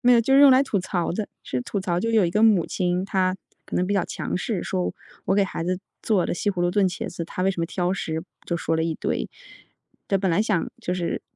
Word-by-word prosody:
没 245 Hz, 0 st, +5 dB
有， 235 Hz, -, +6 dB
就 270 Hz, +4 st, +2 dB
是 275 Hz, -, +7 dB
用 285 Hz, -1 st, +9 dB
来 260 Hz, +1 st, +6 dB
吐 215 Hz, -8 st, 0 dB
槽 175 Hz, -2 st, -1 dB
的。 210 Hz, +2 st, -3 dB, 0.2 s
是 125 Hz, -, -2 dB
吐 200 Hz, -, -3 dB
槽 175 Hz, -2 st, -1 dB
就 230 Hz, +3 st, 0 dB
有 220 Hz, -4 st, +4 dB
一 170 Hz, -, 0 dB
个 210 Hz, +5 st, +1 dB
母 210 Hz, -7 st, +5 dB
亲， 180 Hz, 0 st, 0 dB
她 190 Hz, -2 st, +1 dB, 0.3 s
可 -, -, -4 dB
能 180 Hz, -, +1 dB
比 205 Hz, -, 0 dB
较 195 Hz, -3 st, +2 dB
强 -, -, -3 dB
势， 195 Hz, -1 st, -2 dB
说 185 Hz, -1 st, -1 dB, 0.3 s
我 195 Hz, -, +2 dB
给 200 Hz, -, +4 dB
孩 185 Hz, -, -4 dB
子 180 Hz, +1 st, -1 dB, 0.2 s
做 200 Hz, -6 st, +2 dB
了 -, -, -1 dB
西 205 Hz, -, 0 dB
葫 180 Hz, -3 st, -4 dB
芦 175 Hz, 0 st, +2 dB
炖 195 Hz, 0 st, +3 dB
茄 180 Hz, -, -5 dB
子， 170 Hz, -, -5 dB
他 180 Hz, -, -4 dB
为 190 Hz, -, +3 dB
什 180 Hz, -3 st, -4 dB
么 165 Hz, -, 0 dB
挑 180 Hz, +1 st, -1 dB
食， 160 Hz, -4 st, -3 dB, 0.2 s
就 170 Hz, -, -1 dB
说 165 Hz, 0 st, -1 dB
了 160 Hz, -, +1 dB
一 165 Hz, -1 st, -1 dB
堆。 -, -, -2 dB, 0.8 s
对， 195 Hz, -, +2 dB
本 190 Hz, -1 st, +1 dB
来 175 Hz, +5 st, +3 dB
想 205 Hz, -6 st, 0 dB
就 180 Hz, -, -2 dB
是 180 Hz, -2 st, -2 dB
185 Hz, 290 characters per minute, -24 LUFS, 175-205 Hz, 0.8 s, 用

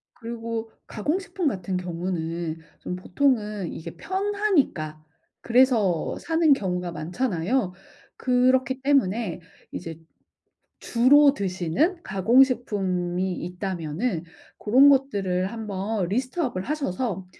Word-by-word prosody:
그리고 230 Hz, -1 st, -5 dB, 0.2 s
가공식품 355 Hz, -, -2 dB
같은 185 Hz, -5 st, -2 dB
경우는 170 Hz, -2 st, -3 dB, 0.2 s
좀 180 Hz, -, -5 dB
보통은 210 Hz, -, 0 dB
이게 165 Hz, +1 st, -8 dB
편하니까 375 Hz, -, 0 dB, 0.4 s
그래서 230 Hz, -8 st, +3 dB
사는 325 Hz, -2 st, +3 dB
경우가 180 Hz, -6 st, -2 dB
많잖아요. 180 Hz, +5 st, -1 dB, 0.4 s
그렇기 255 Hz, +1 st, +2 dB
때문에 235 Hz, -, +1 dB, 0.3 s
이제 165 Hz, -1 st, -7 dB, 0.8 s
주로 280 Hz, +4 st, +5 dB
드시는 200 Hz, -, -1 dB
가공식품이 195 Hz, -5 st, +2 dB
있다면은 180 Hz, +1 st, -3 dB, 0.3 s
고런 260 Hz, +7 st, +6 dB
것들을 200 Hz, -10 st, +1 dB
한번 210 Hz, -2 st, -3 dB
list 250 Hz, -, -2 dB
up을 245 Hz, -, -1 dB
하셔서 235 Hz, -, -3 dB
210 Hz, 250 characters per minute, -25 LUFS, 180-260 Hz, 0.8 s, 고런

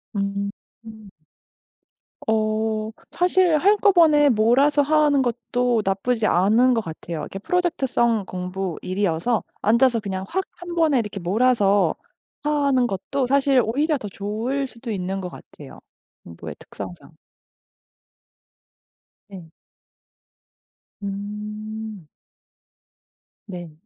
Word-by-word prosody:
음 200 Hz, 0 st, -1 dB, 0.3 s
흠. 220 Hz, -2 st, -12 dB, 1.2 s
어 220 Hz, 0 st, 0 dB, 0.2 s
사실 360 Hz, -2 st, +3 dB
한꺼번에 340 Hz, -6 st, +5 dB
몰아서 255 Hz, +6 st, +4 dB
하는 295 Hz, -1 st, +3 dB
것도 245 Hz, 0 st, 0 dB
나쁘지 215 Hz, +4 st, 0 dB
않은 220 Hz, +8 st, +4 dB
것 225 Hz, -, +1 dB
같아요. 165 Hz, -1 st, -6 dB
이렇게 195 Hz, -, -6 dB
프로젝트 350 Hz, -, 0 dB
성 235 Hz, -4 st, +1 dB
공부, 180 Hz, -1 st, -4 dB
일이어서 190 Hz, +3 st, 0 dB, 0.2 s
앉아서 235 Hz, +2 st, +3 dB
그냥 190 Hz, -2 st, -4 dB
확 380 Hz, +2 st, -1 dB
1 350 Hz, 0 st, -7 dB
번에 310 Hz, -7 st, +3 dB, 0.2 s
몰아서 200 Hz, -2 st, +2 dB, 0.5 s
하는 280 Hz, -4 st, +2 dB
것도 250 Hz, +7 st, -2 dB
사실 275 Hz, -1 st, +3 dB
오히려 295 Hz, +8 st, 0 dB
더 210 Hz, -, -7 dB
좋을 225 Hz, +8 st, -3 dB
수도 235 Hz, -1 st, -8 dB
있는 190 Hz, 0 st, -3 dB
것 180 Hz, -, -5 dB
같아요 -, -, -13 dB, 0.4 s
공부의 80 Hz, -3 st, -9 dB
특성상. 95 Hz, -3 st, -10 dB, 2.2 s
예. 180 Hz, -5 st, -11 dB, 1.5 s
음. 210 Hz, 0 st, -6 dB, 1.4 s
네. 175 Hz, -5 st, -8 dB
220 Hz, 200 characters per minute, -23 LUFS, 195-275 Hz, 2.2 s, 한꺼번에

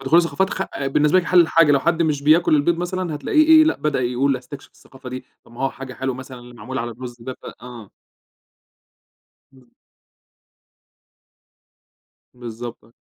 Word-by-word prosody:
فدخول 135 Hz, +5 st, +3 dB
الثقافات 190 Hz, +3 st, 0 dB
خ 190 Hz, -, -2 dB, 0.2 s
بالنسبة 150 Hz, +5 st, +3 dB
لك 180 Hz, -, -1 dB
حلّ 180 Hz, -, +5 dB
الحاجة، 165 Hz, -2 st, +4 dB
لو 140 Hz, -, +3 dB
حد 170 Hz, +2 st, +1 dB
مش 150 Hz, -3 st, -1 dB
بياكل 155 Hz, +2 st, +4 dB
البيض 155 Hz, +4 st, +1 dB
مثلًا 180 Hz, -1 st, -3 dB
هتلاقيه 305 Hz, -, +2 dB
إيه 315 Hz, -1 st, +7 dB
لأ 310 Hz, -, +1 dB
بدأ 150 Hz, -3 st, -1 dB
يقول 130 Hz, +2 st, 0 dB
أستكشف 130 Hz, +3 st, -11 dB
الثقافة 130 Hz, -1 st, -14 dB
دي، 130 Hz, +1 st, -7 dB, 0.2 s
طَب -, -, -20 dB
ما 120 Hz, -, -12 dB
هو 135 Hz, -, +1 dB
حاجة 135 Hz, -1 st, -9 dB
حلوة 130 Hz, 0 st, -3 dB
مثلًا 130 Hz, 0 st, -10 dB
اللي 120 Hz, 0 st, -14 dB
معمول 125 Hz, +3 st, -6 dB
على 120 Hz, 0 st, -4 dB
الرز 120 Hz, +1 st, -9 dB
ده 130 Hz, +2 st, -6 dB
ف -, -, -19 dB, 0.2 s
آه. 120 Hz, -5 st, -11 dB, 1.6 s
إمم. 125 Hz, -3 st, -23 dB, 2.6 s
بالضبط. 120 Hz, -1 st, -9 dB
135 Hz, 165 wpm, -21 LUFS, 125-165 Hz, 2.6 s, إيه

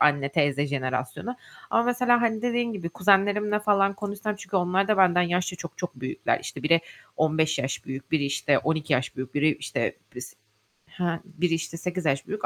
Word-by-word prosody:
anne 145 Hz, -2 st, +3 dB
teyze 145 Hz, -1 st, +1 dB
jenerasyonu. 130 Hz, -, -3 dB, 0.3 s
Ama 230 Hz, -, +4 dB
mesela, 245 Hz, 0 st, +3 dB
hani, 225 Hz, -2 st, 0 dB
dediğin 240 Hz, -1 st, 0 dB
gibi 180 Hz, -5 st, -4 dB
kuzenlerimle 205 Hz, +3 st, +3 dB
falan 200 Hz, -2 st, +3 dB
konuşsam 205 Hz, +1 st, -4 dB
çünkü 190 Hz, 0 st, -4 dB
onlar 185 Hz, +2 st, +1 dB
da 215 Hz, -, +3 dB
benden 180 Hz, -2 st, +5 dB
yaşça 180 Hz, +1 st, 0 dB
çok 170 Hz, -1 st, -9 dB
çok 180 Hz, -6 st, -4 dB
büyükler. 130 Hz, -, -1 dB
İşte -, -, -7 dB
biri 165 Hz, +2 st, +4 dB, 0.4 s
15 155 Hz, 0 st, +2 dB
yaş 135 Hz, -, -3 dB
büyük, 135 Hz, 0 st, -7 dB
biri 155 Hz, -3 st, +2 dB
işte 140 Hz, 0 st, +2 dB
12 155 Hz, -1 st, -1 dB
yaş 125 Hz, 0 st, 0 dB
büyük, 130 Hz, 0 st, -6 dB
biri 150 Hz, +1 st, +3 dB
işte, -, -, -3 dB, 0.2 s
s -, -, -9 dB, 0.5 s
he, 170 Hz, +3 st, -6 dB, 0.2 s
biri 175 Hz, -2 st, -1 dB
işte 165 Hz, 0 st, -3 dB
8 180 Hz, 0 st, -4 dB
yaş 135 Hz, -2 st, 0 dB
büyük. 210 Hz, -, -3 dB
175 Hz, 185 wpm, -26 LUFS, 145-205 Hz, 0.5 s, benden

